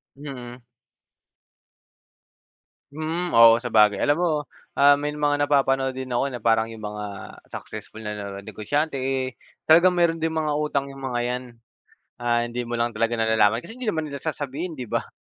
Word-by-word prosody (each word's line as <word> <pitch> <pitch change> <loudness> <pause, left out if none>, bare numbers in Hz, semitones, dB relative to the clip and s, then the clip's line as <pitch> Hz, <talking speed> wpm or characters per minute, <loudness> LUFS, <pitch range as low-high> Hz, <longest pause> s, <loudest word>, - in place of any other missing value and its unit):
Mm. 130 -3 -9 2.3
Mm. 160 +3 -3
Oo, 115 0 +8
sabagay. 110 -4 +3
Alam 145 - +3
mo, 175 - +2 0.5
ah, 145 0 +7
may 145 +1 -3
mga 145 -1 +1
napapanood 135 -2 +2
din 130 0 -6
ako 130 +2 -1
na 120 - -5
parang 115 0 +2
yung 110 -2 -7
mga 105 -2 -7 0.2
successful 110 - -8
na 105 -2 -5
negosyante, 145 +10 -2
eh, 130 -1 -2 0.3
talagang 170 +3 +7
meron 170 -2 +1
ding 160 - +1
mga 155 -2 -1
utang 150 -2 -1
yung 135 0 -10
mga 125 -2 -2
'yan. 125 +1 -2 0.8
Ah, 120 0 +1
hindi 120 +1 -4
mo 120 0 -2
lang 120 0 0
talaga 115 +1 0
nalalaman 110 +2 +2
kasi 225 - -9
hindi 245 -4 -1
naman 160 -3 -1
nila 140 -2 -7
sasabihin, 155 +2 -4
'di 125 - -5
ba? - - -1
130 Hz, 160 wpm, -24 LUFS, 115-150 Hz, 2.3 s, Oo